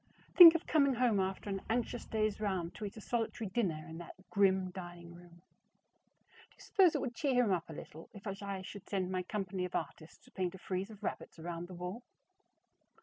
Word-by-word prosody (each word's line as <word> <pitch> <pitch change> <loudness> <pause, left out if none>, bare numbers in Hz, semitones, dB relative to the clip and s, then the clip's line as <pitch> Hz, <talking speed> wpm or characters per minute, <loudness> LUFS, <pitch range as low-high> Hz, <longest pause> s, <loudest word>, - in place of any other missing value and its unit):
Think 335 -2 +12
of 335 - -1
coming 280 -4 +3
home 235 -4 +3
after 190 +2 -2
an 195 -1 -2
anxious 240 +1 -1
day's 215 -1 0
round 185 -5 -1
to 215 - -6
eat 200 - -7
a - - -8
solitary 225 -2 -2
dinner 175 -9 -1
in 160 +1 -8
that 175 - -9 0.2
grim 190 -2 +3
dining 175 -2 -9
room! 175 0 -16 1.1
Do - - -26
you - - -32
suppose 370 -5 +4
it - - 0
would 250 -3 -3
cheer 275 +1 0
him 215 - +1
up 175 -3 -1
a - - -6
little 155 +2 -10
if 200 - -13
I 195 -1 -4
should 190 0 -10
send 190 -2 -1
my 185 -1 0
company 190 -1 -3
of 180 - -4
artists 155 0 -6
to - - -19
paint 185 -1 -2
a - - -8
frieze 190 +2 -3
of 210 -1 -13
rabbits - - -4
around 170 +1 -5
the 185 - -9
wall? 180 +6 -5
195 Hz, 210 wpm, -34 LUFS, 175-220 Hz, 1.1 s, Think